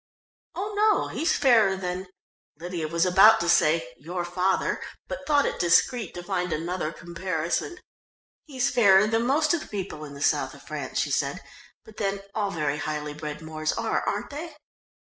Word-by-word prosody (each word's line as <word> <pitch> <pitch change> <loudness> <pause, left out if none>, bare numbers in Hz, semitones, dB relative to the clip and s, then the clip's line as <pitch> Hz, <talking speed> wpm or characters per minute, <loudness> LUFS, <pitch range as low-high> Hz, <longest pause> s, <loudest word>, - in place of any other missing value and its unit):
"Oh, 410 +3 -4
no, 425 +1 +3
he's 325 +1 0
fairer 225 -8 +4
than 185 0 -4 0.3
" - - -63
Lydia 170 -2 -4
was 165 +3 +1
about 195 +5 +7
to 170 - -1
say 165 -5 +3
"your 175 +5 -4
father," 180 +2 0 0.3
but - - -6
thought 290 -2 +4
it - - -2
discreet 195 +5 +2
to 175 - -6
find 180 0 -2
another 165 0 -2
comparison. 170 - -3 0.7
"He's 275 -2 0
fairer 200 -4 +6
than 225 +2 0
most 305 +4 +3
of 340 - +1
the - - -10
people 190 -6 -5
in 145 -1 -9
the 140 - -5
south - - +1
of - - -15
France," - - -5
she - - 0
said, - - -1 0.4
"but 220 - -16
then 195 -1 -2
all 205 -2 -1
very 150 -5 -1
highly 150 -1 -3
bred 150 0 -7
Moors 155 0 -2
are, 230 -1 -1
aren't 205 +6 -3
they?" 310 +2 -7
185 Hz, 180 wpm, -26 LUFS, 165-230 Hz, 0.7 s, about